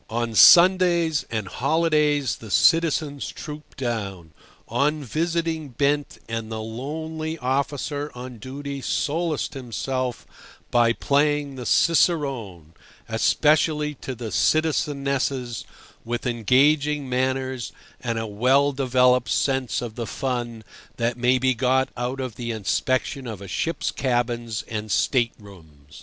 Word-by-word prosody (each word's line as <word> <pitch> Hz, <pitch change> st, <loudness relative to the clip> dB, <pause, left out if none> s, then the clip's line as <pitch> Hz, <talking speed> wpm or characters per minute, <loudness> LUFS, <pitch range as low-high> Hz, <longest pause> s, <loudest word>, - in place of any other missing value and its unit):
On 115 Hz, 0 st, -2 dB
Sundays 170 Hz, -, +6 dB
and 110 Hz, -3 st, -3 dB
holidays 150 Hz, -, +1 dB
the 110 Hz, -, -11 dB
citizens 155 Hz, -, +2 dB
trooped 150 Hz, -1 st, -9 dB
down, 100 Hz, -, -4 dB, 0.3 s
on 150 Hz, +1 st, 0 dB
visiting 165 Hz, +2 st, -2 dB
bent, 145 Hz, +3 st, 0 dB
and 115 Hz, -1 st, -4 dB
the 110 Hz, -, -3 dB
lonely 155 Hz, +8 st, -5 dB
officer 145 Hz, +2 st, -2 dB
on 125 Hz, -1 st, -8 dB
duty 140 Hz, +3 st, -6 dB
solaced 160 Hz, +3 st, -1 dB
himself 130 Hz, -1 st, -3 dB, 0.5 s
by 120 Hz, -1 st, +4 dB
playing 145 Hz, +2 st, +1 dB
the 125 Hz, -2 st, -6 dB
cicerone—especially 150 Hz, -, +1 dB
to 130 Hz, -2 st, -7 dB
the 115 Hz, -2 st, -6 dB
citizenesses 140 Hz, -, 0 dB, 0.4 s
with 120 Hz, +1 st, -4 dB
engaging 140 Hz, +5 st, +2 dB
manners 130 Hz, -1 st, -1 dB, 0.3 s
and 115 Hz, -2 st, -1 dB
a 115 Hz, -, -2 dB
well 130 Hz, +7 st, +2 dB
developed 125 Hz, -2 st, +2 dB
sense 130 Hz, -3 st, 0 dB
of 115 Hz, -3 st, -6 dB
the 115 Hz, 0 st, -5 dB
fun 120 Hz, -4 st, -3 dB, 0.3 s
that 120 Hz, 0 st, 0 dB
may 125 Hz, +1 st, +3 dB
be 130 Hz, +1 st, +2 dB
got 130 Hz, +2 st, +1 dB
out 125 Hz, +2 st, -3 dB
of 130 Hz, -4 st, -5 dB
the 120 Hz, -1 st, -4 dB
inspection 130 Hz, +5 st, -1 dB
of 110 Hz, -4 st, -6 dB
a 100 Hz, -, -9 dB
ship's 165 Hz, -, -2 dB
cabins 120 Hz, -3 st, -1 dB
and 110 Hz, -2 st, -5 dB
state 120 Hz, +2 st, +2 dB
rooms. 80 Hz, -9 st, -16 dB
130 Hz, 120 wpm, -24 LUFS, 115-145 Hz, 0.5 s, Sundays